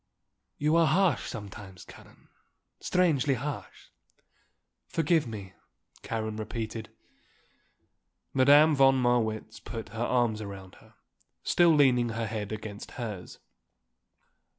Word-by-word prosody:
You 150 +2 +1
are 165 -1 +5
harsh 170 -2 +2
sometimes, 100 -4 -9
Karen, - - -17 0.5
strangely 155 -7 +2
harsh." 145 +4 -7 1.0
"Forgive 165 -3 +1
me," 100 -5 -8 0.5
Karen 110 -1 -4
repeated. 110 0 -5 1.4
Madame 145 +4 +6
von 135 -1 +5
Marwitz 115 -3 0
put 115 +1 -7
her 115 +1 -4
arms 120 -3 +1
around 95 -2 -9
her, - - -22 0.5
still 170 -2 +4
leaning 125 -5 +4
her 115 0 -3
head 105 -1 -4
against 105 -1 -7
hers. 105 -7 -6
115 Hz, 105 wpm, -28 LUFS, 110-140 Hz, 1.4 s, Madame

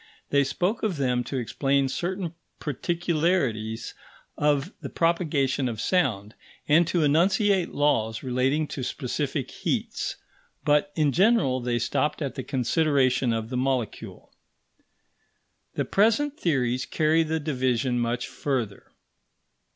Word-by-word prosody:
They 140 0 +4
spoke 180 - -1
of 200 -7 -1
them 125 -3 +1
to 135 - -3
explain 135 +3 +1
certain 175 +4 -3 0.3
particularities 150 -7 -1 0.4
of 150 +4 +1
the - - -5
propagation 145 -6 +1
of 110 -2 -5
sound, 115 - 0 0.3
and 160 +3 +5
to 170 -2 +1
enunciate 185 +5 +3
laws 115 -7 +1
relating 130 +4 +1
to 135 - -5
specific 125 - -3
heats; - - -2 0.5
but, 145 0 +3
in 150 -3 +2
general, 175 - +3
they 120 -1 -1
stopped 150 +6 -1
at 140 - -3
the 135 - -4
consideration 130 -1 +1
of 115 0 -2
the 125 - -2
molecule. 130 -3 -3 1.4
The - - 0
present 230 +8 +2
theories 130 - 0
carry 160 +1 +2
the 160 0 -1
division 130 -4 0
much 120 +1 -1
further. 120 -8 -4
140 Hz, 120 wpm, -26 LUFS, 125-165 Hz, 1.4 s, and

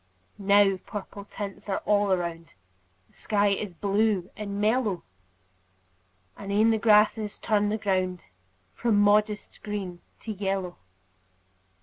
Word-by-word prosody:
Now 200 -1 +4
purple 200 +1 -8
tints 200 0 -7
are 195 - -2
all 205 -1 +2
around; 170 -5 -2 0.6
The - - -30
sky 205 -1 +1
is 200 0 -2
blue 200 0 0
and 200 -1 -5
mellow; 215 -3 +1 1.3
And 200 - -7
e'en 215 +3 +4
the 220 - +1
grasses 210 -1 +3
turn 210 -2 +1
the 215 - 0
ground 185 -4 -1 0.5
From 225 -4 +1
modest 210 +1 +2
green 195 -4 -5 0.2
to 220 - -5
yellow. 195 -3 -3
205 Hz, 120 wpm, -27 LUFS, 195-210 Hz, 1.3 s, Now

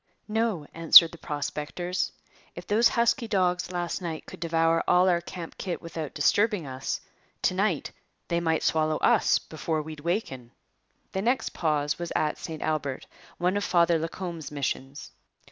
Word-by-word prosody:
'No,' 215 -7 -1
answered 165 0 +8
the 170 - -12
prospectors. 150 +5 -3 0.4
'If - - -8
those 225 +3 +4
husky 235 0 +1
dogs 180 -3 0
last 175 +1 -3
night 165 -3 -5
could - - -11
devour 165 0 +2
all 180 +1 +5
our 175 -2 +3
camp 170 -1 -9
kit 180 -3 -3
without 165 -3 -6
disturbing 200 +4 +2
us, 130 0 -4 0.4
to - - +3
night - - 0 0.4
they 170 - 0
might 160 -2 0
swallow 155 -1 +1
us - - +3
before 155 0 -3
we'd 155 0 -8
waken.' 145 - -3 0.6
The 190 - -2
next 245 +5 +1
pause 150 -2 -1
was 175 -1 -4
at 150 -1 0
St 160 -2 -6
Albert, 145 -4 -2 0.3
one 180 +2 +1
of 205 - 0
Father 170 -3 +3
Lacombe's 165 0 -5
missions. 140 -1 -4
165 Hz, 155 wpm, -27 LUFS, 155-180 Hz, 0.6 s, answered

